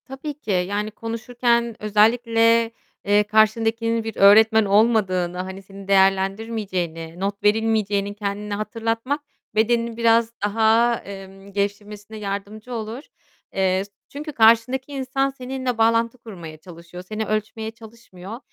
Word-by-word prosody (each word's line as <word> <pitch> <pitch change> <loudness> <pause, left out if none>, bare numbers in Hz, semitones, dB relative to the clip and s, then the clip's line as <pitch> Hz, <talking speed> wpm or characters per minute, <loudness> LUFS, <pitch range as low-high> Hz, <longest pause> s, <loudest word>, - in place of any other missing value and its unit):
Tabii 270 +3 -6
ki, 265 -7 -6
yani, 200 +3 -1
konuşurken 235 +1 -1
özellikle, 230 +2 +3 0.3
eee, 205 +1 +4
karşındakinin 225 +2 +2
bir 225 -1 -5
öğretmen 220 +2 +6
olmadığını, 195 -4 +2
hani, 190 +1 -7
senin 195 0 -13
değerlendirmeyeceğini, 190 -4 0
not 200 +1 -3
verilmeyeceğini 210 -2 +1
kendine 205 0 -4
hatırlatmak, 225 +6 -2 0.3
bedenini 230 +1 +1
biraz 230 0 +3
daha, 225 +3 +3
emm, 195 0 -11
gevşemesine 205 +1 -4
yardımcı 210 +3 -6
olur. 225 +4 -5 0.5
Eee, 190 0 +1
s 200 - -22 0.2
çünkü 300 +2 -7
karşındaki 235 +3 +3
insan, 270 0 -1
seninle 260 -2 -4
bağlantı 230 +1 +2
kurmaya 175 -9 -10
çalışıyor. 170 +2 -12
Seni 215 +2 -3
ölçmeye 215 +1 -3
çalışmıyor 225 -2 -11
220 Hz, 115 wpm, -22 LUFS, 200-230 Hz, 0.5 s, öğretmen